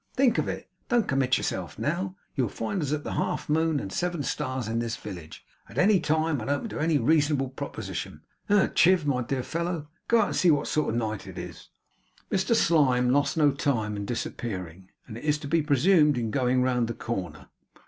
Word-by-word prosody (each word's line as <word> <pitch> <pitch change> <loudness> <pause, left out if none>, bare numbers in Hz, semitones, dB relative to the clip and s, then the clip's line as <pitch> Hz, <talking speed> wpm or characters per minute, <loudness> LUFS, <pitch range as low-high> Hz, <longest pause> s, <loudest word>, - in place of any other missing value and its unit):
Think 255 -3 +3
of - - -1
it. - - -5 0.2
Don't 240 -4 +2
commit 130 -2 +2
yourself 90 -2 -3
now. 180 +5 -2 0.2
You'll 125 -6 0
find 115 - -3
us 145 -2 -2
at 150 -1 -1
the - - -4
Half - - -2
Moon 160 -1 +2
and 95 -6 -6
Seven 175 -4 -1
Stars 130 -3 -2
in 115 +1 -1
this 115 -1 -2
village, 85 -6 -9 0.2
at - - -12
any 195 +1 +5
time, 155 -4 0
and 110 - -5
open 145 +11 -1
to - - -5
any 160 0 +2
reasonable 145 -3 +2
proposition. 130 - -6 0.3
Hem! 205 -1 +4
Chiv, 180 -3 +4
my 135 -3 +1
dear 130 +1 -2
fellow, 170 -1 -3 0.2
go 235 -1 +4
out - - +3
and - - -3
see 180 - +4
what 150 -3 +3
sort 155 - 0
of 110 - -1
a - - +1
night 110 -3 -3
it - - -9
is.' - - -8 0.6
Mr 195 +4 +2
Slyme 130 - +3
lost 145 +4 +2
no 150 -2 +5
time 125 -7 -1
in 100 0 -4
disappearing, 95 -6 -5 0.2
and 110 0 -8
it - - -13
is 150 0 +2
to 150 -1 -8
be 165 +3 +2
presumed 150 0 +4
in 115 -2 -2
going 125 0 +2
round 125 -2 +1
the 115 - -4
corner. 95 -10 -5
140 Hz, 210 wpm, -27 LUFS, 120-165 Hz, 0.6 s, any